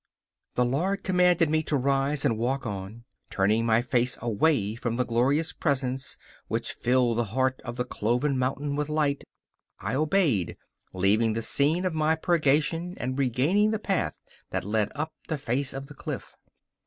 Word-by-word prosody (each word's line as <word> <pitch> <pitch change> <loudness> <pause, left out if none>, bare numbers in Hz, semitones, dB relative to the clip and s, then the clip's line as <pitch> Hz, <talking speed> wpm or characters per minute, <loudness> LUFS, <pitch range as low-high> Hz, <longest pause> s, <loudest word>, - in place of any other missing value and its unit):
The 125 - +3
Lord 180 +11 0
commanded 180 -3 +3
me 155 0 +3
to 150 -2 0
rise 140 +2 +1
and 120 -5 +2
walk 130 +3 -1
on, 100 -3 -4
and, 115 +4 -13 0.3
turning 105 +4 +2
my 115 +1 +3
face 125 0 +1
away 115 -1 +1
from 115 0 -3
the 125 +1 0
glorious 140 +7 +1
Presence, 135 -3 -1 0.3
which - - -2
filled 120 -2 +1
the 120 - +1
heart 130 +4 0
of 120 0 -6
the 125 - -1
cloven 125 +5 0
mountain 135 +3 -1
with 150 0 -2
light, 150 -2 0 0.6
I - - -3
obeyed, 150 - +1 0.3
leaving 105 +4 +2
the 115 +1 -2
scene 155 +10 +2
of 180 - 0
my 155 0 +2
purgation 165 +2 +1
and 130 +2 -3
regaining 140 - +2
the 220 - 0
path 195 -3 -1 0.3
that - - -3
led 105 0 0
up 155 +2 -3
the 160 - -1
face 135 +1 -1
of 135 0 -6
the 145 - -12
cliff. - - -6
135 Hz, 170 wpm, -27 LUFS, 120-155 Hz, 0.6 s, The